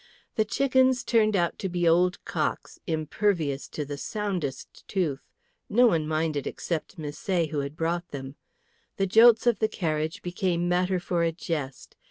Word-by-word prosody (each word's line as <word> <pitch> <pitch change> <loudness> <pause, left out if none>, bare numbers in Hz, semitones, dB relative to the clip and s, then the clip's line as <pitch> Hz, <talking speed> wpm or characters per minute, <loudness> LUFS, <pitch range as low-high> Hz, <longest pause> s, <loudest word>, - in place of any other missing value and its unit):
The 220 - +1
chickens 260 +1 +2
turned 215 -3 +3
out 175 -2 0
to 190 - -2
be 175 -1 0
old 180 +2 +3
cocks, - - -3
impervious 160 -2 0
to 150 - -5
the 140 0 -6
soundest 185 -11 -4
tooth. 160 -8 -2 0.4
No 245 +4 +5
one 165 -9 +2
minded 155 -2 -1
except 170 +2 -4
Misset, 160 +2 -2
who 150 - -1
had 140 +1 -4
brought 170 +2 -1
them. 135 -1 -7 0.6
The 195 - +2
jolts 225 +4 +6
of 235 -4 +3
the 220 - +3
carriage 155 -5 -2
became 175 -1 -1
matter 180 +1 +1
for 175 -1 -1
a 165 0 +2
jest. 150 -5 -5
175 Hz, 160 wpm, -27 LUFS, 155-200 Hz, 0.6 s, jolts